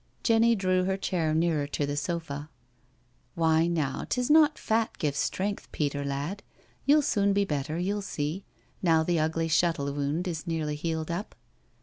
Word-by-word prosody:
Jenny 230 0 +4
drew 185 -2 +1
her 190 0 0
chair 170 -5 -1
nearer 160 -3 +1
to 145 0 -1
the 145 0 -3
sofa. 145 -2 -3 0.4
" 120 0 -39
Why 160 0 +3
now, 155 -6 -1
'tis 250 +3 0
not 310 -1 +6
fat 225 0 0
gives 150 -4 -1
strength, 200 +2 -2
Peter 145 -1 -1
lad. 140 +8 -3 0.5
You'll 295 +1 +6
soon 200 -7 +2
be 200 0 +2
better, 150 -1 -2
you'll 200 +4 -1
see, 160 -1 -3 0.4
now 165 -3 +4
the 170 0 +1
ugly 160 +1 0
shuttle 160 -4 +1
wound 145 +5 -1
is 170 0 -4
nearly 155 -3 -1
healed 160 +1 -3
up." 185 +5 -4
165 Hz, 165 wpm, -28 LUFS, 150-195 Hz, 0.5 s, not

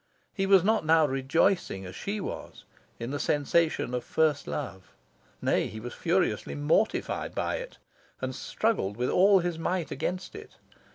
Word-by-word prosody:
He 195 -1 -1
was 195 -3 +6
not 215 0 +2
now 160 0 +5
rejoicing, 135 - +1
as 90 0 -8
she 210 +2 -3
was, - - -7 0.3
in 115 +2 -5
the 145 - -2
sensation 150 -2 +1
of 125 - -1
first 155 -3 +1
love; 95 -10 -6 0.5
nay, - - +2
he 110 - -8
was 120 +2 -7
furiously 180 +2 0
mortified 155 +9 0
by - - -1
it, - - -8 0.4
and - - -3
struggled 200 - -1
with 125 +1 0
all 195 +1 +5
his 170 -2 -2
might 175 0 -1
against 180 +1 -3
it. 425 +1 -11
165 Hz, 160 wpm, -28 LUFS, 135-195 Hz, 0.5 s, was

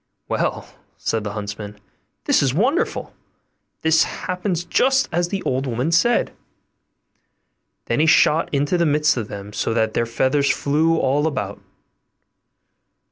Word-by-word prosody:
'Well,' - - -2 0.3
said 110 -1 -2
the 105 -1 -4
huntsman, 105 0 -6 0.5
'this - - +3
is 135 -3 +1
wonderful; 260 - 0 0.7
this 160 0 +4
happens 180 -1 -3
just 265 +8 +2
as 175 +1 0
the 195 +1 -4
old 130 +1 -1
woman 125 +6 -1
said'; 235 +9 +2 1.5
then - - -1
he 160 - +3
shot 160 0 +4
into 145 +5 0
the 170 - +3
midst 150 +1 +2
of 115 -4 -3
them 100 0 -8
so 110 +2 -1
that 110 -1 +1
their 115 - 0
feathers 135 +5 +1
flew 160 +3 +1
all 145 +2 +1
about. 150 - -4
145 Hz, 135 wpm, -21 LUFS, 115-170 Hz, 1.5 s, this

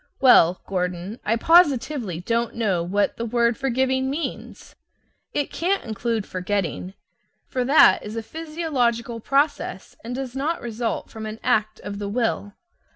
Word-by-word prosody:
Well, 185 -9 +6
Gordon, 180 +3 -3
I 225 - +1
positively 265 - +3
don't 230 +4 -1
know 205 -7 +1
what 200 +4 0
the 230 - -3
word 235 0 +2
"forgiving" 260 0 0
means. 300 +5 -5 0.6
It 290 - -2
can't 380 +4 0
include 220 0 -2
"forgetting," 185 0 -3 0.5
for 255 - -2
that 255 -7 +6
is 210 +1 -7
a 225 - -3
physiological 255 -6 -2
process, 275 - -1
and 240 +2 -5
does 260 -1 -5
not 300 +5 -1
result 230 0 -3
from 220 -1 -6
an 215 +1 -7
act 215 0 +1
of 205 0 -6
the 200 -1 -3
will. 220 -2 -1
235 Hz, 145 wpm, -23 LUFS, 205-265 Hz, 0.6 s, Well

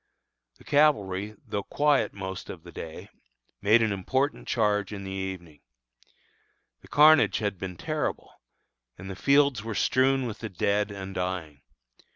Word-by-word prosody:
The - - -18
cavalry, 105 -9 +2
though 100 - -3
quiet 145 +7 +1
most 95 -1 -7
of - - -8
the - - -12
day, 80 -1 -8 0.5
made 110 +3 +5
an 110 - +1
important 130 +9 -1
charge 105 -3 +1
in 100 -2 -6
the 95 - -6
evening. 95 -5 -6 1.2
The - - -18
carnage 155 +1 +6
had 100 -4 -2
been 90 -2 -6
terrible, - - -3 0.6
and 95 +1 -8
the - - -6
fields 140 -4 +3
were 110 -1 -5
strewn 130 +3 +2
with 115 -3 -5
the 110 - -5
dead 100 +2 0
and 95 -1 -7
dying. 90 -6 -4
100 Hz, 150 wpm, -27 LUFS, 95-130 Hz, 1.2 s, carnage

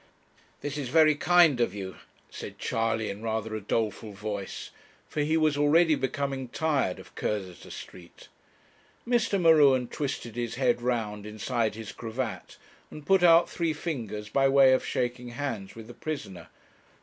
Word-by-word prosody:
'This 145 0 -4
is 135 -4 -4
very 155 +1 +5
kind 160 -3 +4
of 110 -4 0
you,' 95 -2 -6 0.3
said - - -8
Charley, 115 -1 -1
in 100 +2 -8
rather 110 -1 -2
a 110 - -4
doleful 110 0 -2
voice, 100 -1 -5 0.4
for 150 - -2
he 155 +2 +2
was 155 -2 +2
already 155 +3 +4
becoming 135 -1 -2
tired 140 -7 0
of - - -14
Cursitor 95 -5 -4
Street. 85 -1 -11 0.8
Mr. 235 -4 +2
M'Ruen 145 -7 +5
twisted 130 -6 -4
his 120 -1 -3
head 120 -2 +1
round 110 -4 -2
inside 110 +1 -1
his 110 -2 -7
cravat, 115 +1 -5 0.3
and 150 - -11
put 195 -1 +4
out 170 -1 +6
three 165 -2 -1
fingers 115 - -5
by 135 +4 +2
way 135 -1 +6
of 130 - +2
shaking 125 -1 -2
hands 120 -6 -5
with 115 -1 -9
the 120 - -11
prisoner. 135 - -6
125 Hz, 155 wpm, -28 LUFS, 110-150 Hz, 0.8 s, out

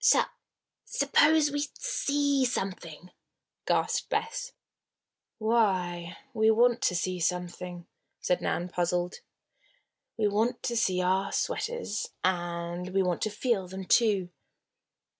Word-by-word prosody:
"Sup - - +5 0.5
suppose 295 +2 +3
we 290 - -1 0.2
see 285 - +1
something?" 180 -7 -3 0.6
gasped - - +1
Bess. - - -2 0.9
"Why, 185 -7 +1 0.2
we 220 -1 +3
want 240 +2 +4
to 180 - +2
see 180 +1 -1
something," 180 0 -3 0.3
said 180 - 0
Nan, 175 - -1
puzzled. 175 0 -1 1.0
"We 215 -2 +2
want 220 +4 0
to 235 - -1
see 185 -5 +1
our 190 +2 +1
sweaters. 480 - -2
And 175 0 -2
we 195 - +4
want 180 -2 -1
to 215 - +1
feel 210 -3 -1
them, 190 +1 -7
too." 200 -5 +3
190 Hz, 115 wpm, -29 LUFS, 180-240 Hz, 1.0 s, Sup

